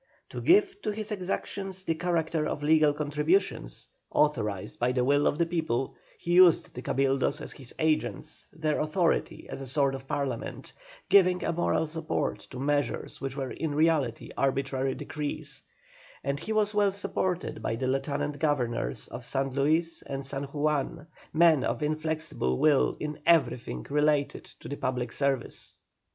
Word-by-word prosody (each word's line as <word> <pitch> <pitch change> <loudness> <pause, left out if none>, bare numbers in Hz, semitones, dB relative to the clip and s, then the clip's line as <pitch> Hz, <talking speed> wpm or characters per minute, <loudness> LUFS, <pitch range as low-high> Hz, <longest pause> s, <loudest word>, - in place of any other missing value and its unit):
To - - -5
give 390 +2 +4
to - - -2
his 215 +1 -4
exactions 190 0 -3
the 165 - 0
character 165 -2 0
of 145 - -3
legal 155 0 +5
contributions, 150 - 0 0.2
authorized 110 -10 0
by 125 +1 +2
the 125 -1 +2
will 145 +2 +3
of 145 - +1
the 170 - +3
people, 160 -7 -1 0.2
he 175 - -2
used 180 -2 +6
the 125 - -6
Cabildos 135 0 +1
as - - -5
his 130 -4 -12
agents, 155 - -1
their 155 -1 -1
authority, 165 +3 0
as - - -6
a 135 - -5
sort 140 +1 +2
of 135 0 -7
Parliament, 140 -1 -3 0.4
giving 185 -2 +5
a 170 - 0
moral 170 -1 +1
support 160 0 -2
to 130 - -8
measures 145 -2 -1
which 135 0 -4
were 135 -2 -3
in 155 -3 -3
reality 150 -7 +1
arbitrary 135 -1 0
decrees; 150 -1 -5 0.6
and 140 +1 -1
he 220 - -5
was 215 -1 +2
well 205 -1 +3
supported 185 - -2
by 115 - -1
the 130 - -2
Lieutenant 145 +2 -1
Governors 120 - -1
of - - -7
San 135 0 -1
Luis 155 +5 +1
and 135 -1 -5
San 135 +1 -3
Juan, 150 +1 -1 0.3
men 160 -3 +5
of - - -1
inflexible 155 - -1
will 150 -3 +3
in 150 0 -4
everything 125 - +2
relating 150 0 +1 0.2
to - - -8
the 145 - -5
public 125 -2 -2
service. 140 -3 -2
150 Hz, 160 wpm, -28 LUFS, 135-165 Hz, 0.6 s, used